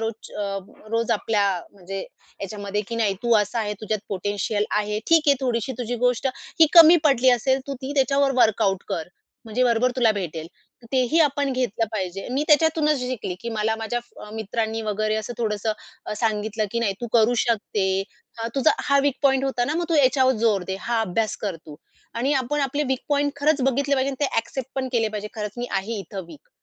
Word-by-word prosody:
रोजच् 225 Hz, 0 st, -5 dB
अ 200 Hz, -1 st, -2 dB, 0.3 s
रोज 230 Hz, 0 st, 0 dB
आपल्या 210 Hz, -1 st, +1 dB, 0.3 s
म्हणजे 195 Hz, 0 st, -7 dB
ह्याच्यामध्ये 205 Hz, +2 st, -6 dB
की 230 Hz, -, -4 dB
नाही 210 Hz, -4 st, +1 dB
तू 235 Hz, -1 st, +3 dB
असा 210 Hz, +4 st, -4 dB
आहे 210 Hz, -1 st, -2 dB
तुझ्यात 215 Hz, -1 st, -2 dB
पोटेन्शियल 205 Hz, +2 st, -1 dB
आहे, 210 Hz, 0 st, 0 dB
ठीक 330 Hz, -2 st, +5 dB
आहे 280 Hz, -, +7 dB
थोडीशी 255 Hz, +1 st, -1 dB
तुझी 245 Hz, 0 st, -2 dB
गोष्ट 250 Hz, +2 st, +1 dB, 0.3 s
की 320 Hz, -, +8 dB
कमी 335 Hz, 0 st, +10 dB
पडली 260 Hz, -3 st, +5 dB
असेल 260 Hz, +2 st, +2 dB
तू 275 Hz, -, -2 dB
ती 275 Hz, +2 st, -4 dB
त्याच्यावर 275 Hz, 0 st, +3 dB
वर्कआउट 195 Hz, -3 st, +2 dB
कर, 160 Hz, +1 st, -3 dB, 0.4 s
म्हणजे 230 Hz, +3 st, 0 dB
बरोबर 240 Hz, +1 st, +3 dB
तुला 230 Hz, -3 st, +4 dB
भेटेल. 165 Hz, -5 st, -4 dB, 0.4 s
तर -, -, -14 dB
तेही 260 Hz, +5 st, +2 dB
आपण 285 Hz, -2 st, +2 dB
घेतलं 235 Hz, -3 st, -1 dB
पाहिजे 195 Hz, -1 st, -4 dB
मी 275 Hz, +3 st, 0 dB
त्याच्यातूनच 305 Hz, -1 st, +3 dB
शिकली 245 Hz, -7 st, -3 dB
की 235 Hz, -, -5 dB
मला 220 Hz, 0 st, 0 dB
माझ्या 225 Hz, +2 st, -2 dB
फ्र 210 Hz, -3 st, -13 dB
मित्रांनी 220 Hz, +1 st, -2 dB
वगैरे 215 Hz, 0 st, -1 dB
असं 220 Hz, +2 st, -4 dB
थोडंसं 215 Hz, -1 st, -1 dB, 0.3 s
अ, -, -, -3 dB
सांगितलं, 215 Hz, -1 st, -1 dB
की 235 Hz, -, 0 dB
नाही 200 Hz, -4 st, 0 dB
तू 240 Hz, -, -3 dB
करू 235 Hz, +1 st, +4 dB
शकते. 200 Hz, -4 st, 0 dB, 0.5 s
तुझा 275 Hz, +3 st, +4 dB
हा 280 Hz, -1 st, +3 dB
वीक 285 Hz, -2 st, +2 dB
पॉइंट 270 Hz, -1 st, +3 dB
होता 255 Hz, -3 st, 0 dB
ना 300 Hz, -, -2 dB
मग 345 Hz, -, 0 dB
तू 330 Hz, -, +1 dB
ह्याच्यावर 260 Hz, -2 st, +4 dB
जोर 205 Hz, -5 st, +3 dB
दे, 190 Hz, 0 st, -3 dB
हा 235 Hz, -1 st, 0 dB
अभ्यास 220 Hz, +1 st, -1 dB
कर 195 Hz, -5 st, -4 dB
तू 150 Hz, -, -9 dB, 0.4 s
आणि 260 Hz, +5 st, 0 dB
आपण 270 Hz, +3 st, 0 dB
आपले 280 Hz, +2 st, 0 dB
वीक 265 Hz, -1 st, 0 dB
पॉइंट 285 Hz, 0 st, +1 dB
खरंच 290 Hz, 0 st, +2 dB
बघितले 275 Hz, +2 st, +2 dB
पाहिजे 270 Hz, 0 st, +1 dB
आणि 275 Hz, +2 st, -2 dB
ते -, -, +3 dB
एक्सेप्ट 260 Hz, +2 st, -4 dB
पण 260 Hz, -1 st, -2 dB
केले 225 Hz, -2 st, +2 dB
पाहिजे 210 Hz, 0 st, -5 dB
खरंच 210 Hz, -2 st, -4 dB
मी 245 Hz, 0 st, -3 dB
आहे 205 Hz, +3 st, -2 dB
इथे 195 Hz, +1 st, -6 dB
वीक. 400 Hz, -, -15 dB
230 Hz, 200 wpm, -23 LUFS, 210-265 Hz, 0.5 s, कमी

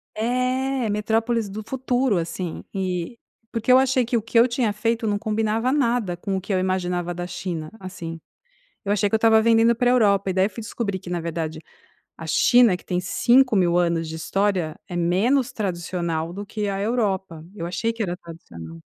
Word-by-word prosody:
É, 255 Hz, +1 st, 0 dB
metrópoles 220 Hz, +1 st, 0 dB
do 215 Hz, +2 st, -6 dB
futuro, 255 Hz, -4 st, 0 dB
assim, 170 Hz, +1 st, -4 dB
e 185 Hz, +2 st, -3 dB, 0.3 s
Porque 230 Hz, +2 st, 0 dB
eu 255 Hz, -, +8 dB
achei 260 Hz, -2 st, +2 dB
que 240 Hz, -, -1 dB
o -, -, -1 dB
que 225 Hz, +2 st, -2 dB
eu 235 Hz, +2 st, +7 dB
tinha 240 Hz, -3 st, 0 dB
feito 225 Hz, +2 st, -1 dB
não 205 Hz, -1 st, +1 dB
combinava 220 Hz, +3 st, 0 dB
nada 240 Hz, -9 st, +1 dB
com 195 Hz, +2 st, -3 dB
o -, -, -4 dB
que 195 Hz, +1 st, -3 dB
eu 185 Hz, -, +2 dB
imaginava 180 Hz, -1 st, -1 dB
da 175 Hz, -, -4 dB
China, 170 Hz, -3 st, -5 dB
assim. 175 Hz, -3 st, -7 dB, 0.7 s
Eu 200 Hz, -, 0 dB
achei 205 Hz, 0 st, +2 dB
que -, -, -1 dB
eu -, -, +7 dB
estava 220 Hz, 0 st, +5 dB
vendendo 230 Hz, +1 st, +4 dB
para 245 Hz, +1 st, +2 dB
a -, -, +4 dB
Europa, 200 Hz, -5 st, +3 dB
e -, -, 0 dB
daí 190 Hz, +2 st, +2 dB
fui 230 Hz, +1 st, -8 dB
descobrir 205 Hz, -3 st, -3 dB
que, 180 Hz, -, -10 dB
na 175 Hz, -1 st, -1 dB
verdade, 160 Hz, -1 st, -4 dB, 0.6 s
a -, -, -9 dB
China, 240 Hz, -7 st, +5 dB
que -, -, -20 dB
tem 180 Hz, 0 st, -1 dB
5.000 195 Hz, -3 st, +3 dB
anos 170 Hz, -2 st, 0 dB
de 160 Hz, -, -6 dB
história, 185 Hz, -1 st, -1 dB
é 175 Hz, -, -6 dB
menos 220 Hz, +10 st, +2 dB
tradicional 170 Hz, -4 st, -3 dB
do 205 Hz, +2 st, -6 dB
que 210 Hz, 0 st, -3 dB
a 195 Hz, 0 st, -2 dB
Europa. 195 Hz, -7 st, -1 dB
Eu 170 Hz, -, -5 dB
achei 225 Hz, +6 st, -1 dB
que 230 Hz, -, -3 dB
era 175 Hz, -3 st, -2 dB
tradicional. 85 Hz, -, -11 dB
205 Hz, 195 wpm, -23 LUFS, 175-230 Hz, 0.7 s, eu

